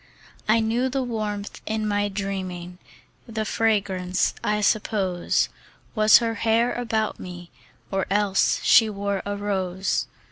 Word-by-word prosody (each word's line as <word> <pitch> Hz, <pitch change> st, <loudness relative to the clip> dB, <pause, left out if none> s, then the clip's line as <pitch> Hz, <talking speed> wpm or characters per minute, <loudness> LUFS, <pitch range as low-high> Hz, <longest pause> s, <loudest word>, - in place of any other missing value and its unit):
I 225 Hz, +1 st, +5 dB
knew 235 Hz, +4 st, +1 dB
the 265 Hz, 0 st, -1 dB
warmth 210 Hz, -4 st, -4 dB
in 215 Hz, 0 st, -1 dB
my 205 Hz, 0 st, 0 dB
dreaming; 185 Hz, -3 st, -5 dB, 0.5 s
The 220 Hz, -1 st, -3 dB
fragrance, 195 Hz, -5 st, +1 dB
I 210 Hz, 0 st, +1 dB
suppose, 195 Hz, -4 st, +1 dB, 0.5 s
Was 215 Hz, 0 st, +7 dB
her 230 Hz, -1 st, -1 dB
hair 230 Hz, +2 st, +2 dB
about 225 Hz, -3 st, -1 dB
me, 175 Hz, -1 st, -9 dB, 0.4 s
Or 195 Hz, -1 st, -1 dB
else 200 Hz, -1 st, +2 dB
she 225 Hz, -2 st, +6 dB
wore 200 Hz, -1 st, -2 dB
a 205 Hz, 0 st, -2 dB
rose. 190 Hz, -2 st, -1 dB
205 Hz, 130 wpm, -24 LUFS, 190-220 Hz, 0.5 s, Was